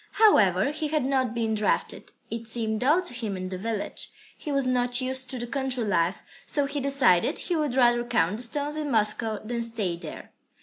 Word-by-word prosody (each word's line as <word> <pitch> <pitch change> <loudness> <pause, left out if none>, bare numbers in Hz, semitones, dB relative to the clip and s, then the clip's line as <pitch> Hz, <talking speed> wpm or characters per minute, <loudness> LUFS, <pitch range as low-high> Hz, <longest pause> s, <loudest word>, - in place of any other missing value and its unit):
However, 215 - +4
he 305 +1 -3
had 300 -3 0
not 260 -3 0
been 225 -1 0
drafted. 215 -1 -1 0.2
It 230 0 -5
seemed 220 -1 -1
dull 305 +9 +3
to 355 - -5
him 220 -5 -4
in 185 0 -5
the 185 - -4
village, 220 0 -3 0.3
he 300 - -6
was 275 -1 +1
not 245 -1 +1
used 260 0 -3
to 255 - -4
the 240 - -3
country 260 -1 -2
life, 185 -3 0 0.2
so 290 -2 +1
he 285 +1 -3
decided 265 -10 +3
he 355 - -1
would 300 -5 0
rather 240 -2 +4
count 215 -5 +1
the - - -5
stones 290 +5 -2
in 300 -1 -2
Moscow 220 -1 +1
than 235 +1 -2
stay 225 -6 -1
there. 175 - -9
240 Hz, 205 wpm, -26 LUFS, 220-275 Hz, 0.3 s, However